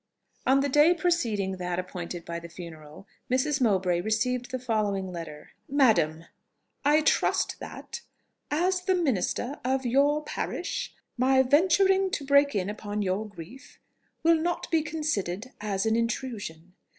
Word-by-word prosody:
On 270 +1 +5
the 280 - +1
day 295 +5 +5
preceding 225 - 0
that 180 -1 -3
appointed 175 -1 -5
for 170 0 -4
the 170 0 -10
funeral, 160 -1 -11 0.2
Mrs. 265 +2 +1
Mowbray 185 -6 +2
received 245 +5 -1
the 255 - -2
following 210 -6 -1
letter: 160 -4 -8 0.2
"MADAM, 215 - +3 0.6
"I 295 +2 +4
trust - - +1
that, - - -8 0.5
as 360 +5 +1
the 370 +1 +1
minister 270 - -1
of 260 +1 0
your 285 +5 +3
parish, - - -3 0.3
my 265 +1 +4
venturing 380 +7 +4
to 280 - -2
break 280 -1 +4
in 190 -2 0
upon 210 0 -3
your 195 +3 -1
grief 205 +8 -12 0.5
will 330 0 +5
not 345 +1 -2
be 325 -1 +3
considered 255 - -3
as 200 -2 -1
an 220 0 +2
intrusion. 220 -8 -3
240 Hz, 140 wpm, -27 LUFS, 185-290 Hz, 0.6 s, On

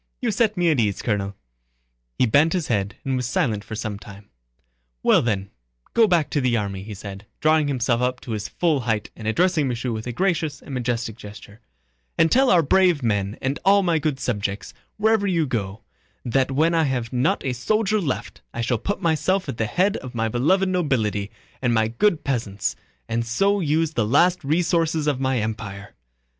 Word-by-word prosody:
"You 240 -3 0
set 215 -1 +1
me 175 -2 +3
at 145 - +1
ease, 105 -4 0
Colonel." 100 -3 -1 0.8
He - - +4
bent 145 +8 +3
his 175 -5 -2
head 100 -3 -1
and 135 -1 0
was 125 -2 -1
silent 110 -4 0
for 110 - -7
some 105 -2 -4
time. 100 -1 -13 0.7
"Well, - - +5
then, 100 -4 -2 0.4
go 225 -1 +5
back 170 -6 +2
to 145 - +1
the 125 -2 +2
army," 100 -3 -3
he 105 +1 -8
said, 100 +1 -9
drawing 155 -1 +3
himself 125 -3 0
up 125 0 0
to 120 - -7
his 105 -1 -3
full 165 -5 +1
height 110 -4 -2
and 110 - -7
addressing 160 +4 +2
Michaud 125 0 -2
with 110 +1 -5
a - - -2
gracious 155 0 -1
and 140 - -10
majestic 120 -3 -2
gesture, 105 0 -12 0.6
"and 165 - +4
tell 265 +1 +4
our 175 -2 +5
brave 175 -1 +3
men 100 -2 0
and 135 +2 -1
all 200 +1 +5
my 170 -3 +2
good 150 -3 -1
subjects 105 -5 -3 0.2
wherever 215 -1 +2
you 170 -4 +1
go 110 -5 -4 0.4
that 130 +2 +1
when 155 +5 +2
I 165 -1 +3
have 125 -4 -2
not 125 +4 +1
a 130 - 0
soldier 215 - 0
left 145 -7 -4
I 115 - -2
shall 115 0 0
put 200 - -3
myself 170 +4 +1
at - - -4
the 110 - 0
head 190 - +1
of 130 -1 -9
my 115 -1 0
beloved 170 - +2
nobility 125 - 0 0.3
and 120 -2 +1
my 110 0 +2
good 165 - +1
peasants 110 -7 -2 0.3
and 115 +1 -1
so 195 - +1
use 160 -1 +1
the 120 - +1
last 175 +9 +3
resources 160 +1 +1
of 145 -3 0
my 130 -1 0
empire. 105 -2 -5
130 Hz, 195 wpm, -23 LUFS, 110-165 Hz, 0.8 s, Well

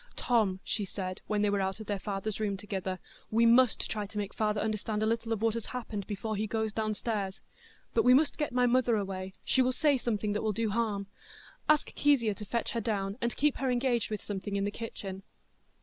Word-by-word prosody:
"Tom," 215 -6 +2
she 210 - -2
said, 185 -1 -5
when 210 -1 +1
they 210 - +3
were 200 -1 +1
out 190 +1 -1
of 220 - -7
their 205 -1 -2
father's 200 +1 -3
room 205 -2 0
together, 190 -2 -3 0.3
"we 230 +2 +4
must 240 +1 +5
try 210 -2 -3
to 210 - -9
make 205 -1 -2
father 210 -1 0
understand 215 0 -1
a - - +3
little 230 +1 0
of 225 -1 -1
what 225 -1 +3
has 230 -1 -4
happened 210 -5 -5
before 215 +1 -3
he 215 +2 -1
goes 220 -1 -1
downstairs. 215 -2 -2 0.5
But - - +3
we 250 +1 +7
must 295 +3 +2
get 295 - 0
my 250 0 +3
mother 245 -1 +3
away. 190 -2 -3
She 260 - +3
will 255 0 +3
say 280 +1 +3
something 210 -3 -1
that 210 - -1
will 215 -1 0
do 220 +1 0
harm. 210 -3 0 0.6
Ask 305 -1 +3
Kezia 260 -7 +3
to 210 +2 -8
fetch 235 +3 -1
her 230 - -1
down, 200 -2 -1
and 235 0 -1
keep 295 0 +2
her 265 - 0
engaged 245 -2 +1
with 215 -1 -4
something 200 0 -4
in 200 - +1
the 205 - -1
kitchen." 195 -4 -6
215 Hz, 225 wpm, -31 LUFS, 200-235 Hz, 0.6 s, we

